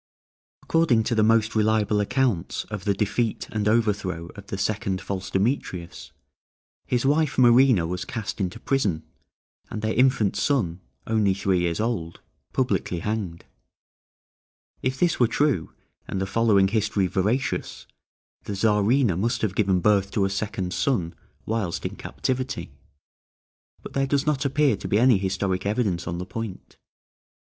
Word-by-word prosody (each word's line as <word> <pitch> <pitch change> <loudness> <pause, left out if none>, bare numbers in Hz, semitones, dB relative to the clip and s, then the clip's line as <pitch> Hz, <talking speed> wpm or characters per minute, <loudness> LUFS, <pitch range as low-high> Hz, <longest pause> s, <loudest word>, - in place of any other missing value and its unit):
According 160 -9 +3
to 120 - -1
the 110 - +3
most 115 +1 +3
reliable 110 -1 +2
accounts 105 -4 0
of 105 -3 -5
the 100 -1 +2
defeat 110 +3 -1
and 105 -1 -1
overthrow 100 -6 0
of 100 -1 -11
the 95 - -4
second 100 -1 -1
false 95 -1 -5
Demetrius, 90 - -2 0.8
his 125 +1 0
wife 150 +1 +2
Marina 125 -6 +5
was 90 +2 -3
cast 110 -2 -5
into 95 +3 -3
prison, 105 - 0 0.7
and 110 -1 -5
their 110 0 0
infant 125 -5 +3
son, 95 - 0 0.2
only 105 -4 +2
three 95 -2 +1
years 85 0 -1
old, 105 -8 -2 0.3
publicly 85 -2 -1
hanged. 105 -5 -3 1.4
If 130 +1 -1
this 175 -1 +2
were 120 - +5
true, 130 - 0 0.4
and 95 - -3
the 95 - 0
following 100 -1 +3
history 105 -2 +1
veracious, 105 +9 -1 0.6
the 100 - -4
Czarina 105 +2 +2
must 115 +6 -1
have 105 -4 0
given 95 -3 +2
birth 100 0 +3
to 100 - +2
a 95 - -1
second 100 -2 -3
son 95 -12 0 0.3
whilst 105 -6 -2
in - - -3
captivity; 130 - -3 1.1
but - - -9
there 135 0 +1
does 140 +1 +1
not 145 -2 0
appear 140 -3 +3
to - - -6
be 100 - +2
any 120 -3 +5
historic 95 0 -1
evidence 100 -5 -1
on 85 - -3
the 90 - -4
point. 110 -1 -7
105 Hz, 150 wpm, -25 LUFS, 95-120 Hz, 1.4 s, Marina